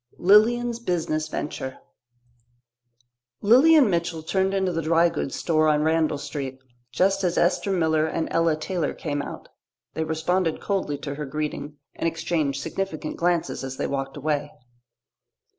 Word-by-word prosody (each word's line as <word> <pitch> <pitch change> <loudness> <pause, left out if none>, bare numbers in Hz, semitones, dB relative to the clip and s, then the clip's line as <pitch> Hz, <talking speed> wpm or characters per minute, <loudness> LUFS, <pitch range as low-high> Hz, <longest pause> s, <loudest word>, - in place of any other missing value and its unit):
Lilian's 235 +5 +4
Business 165 -7 -1
Venture 130 -4 -5 1.6
Lilian 270 +6 +6
Mitchell 170 -3 -1
turned 190 +3 +1
into 190 -2 0
the 165 -1 -1
dry 165 +2 +3
goods 150 -4 -3
store 155 -2 +2
on 150 -1 +3
Randall 160 -1 +2
Street, 140 -2 -5 0.3
just 195 +1 +2
as 175 -2 0
Esther 180 +3 +2
Miller 160 -4 +2
and 160 0 -2
Ella 165 -1 +2
Taylor 160 0 -2
came 145 -2 -3
out. - - -8 0.4
They 160 - -1
responded 160 +2 0
coldly 190 -8 -2
to 140 0 -5
her 150 +1 -5
greeting 150 0 -4 0.2
and - - -2
exchanged 160 -4 -1
significant 165 -5 -4
glances 170 -4 0
as 130 0 -5
they - - -1
walked 135 0 -3
away. 145 0 -1
160 Hz, 140 wpm, -24 LUFS, 150-185 Hz, 1.6 s, Lilian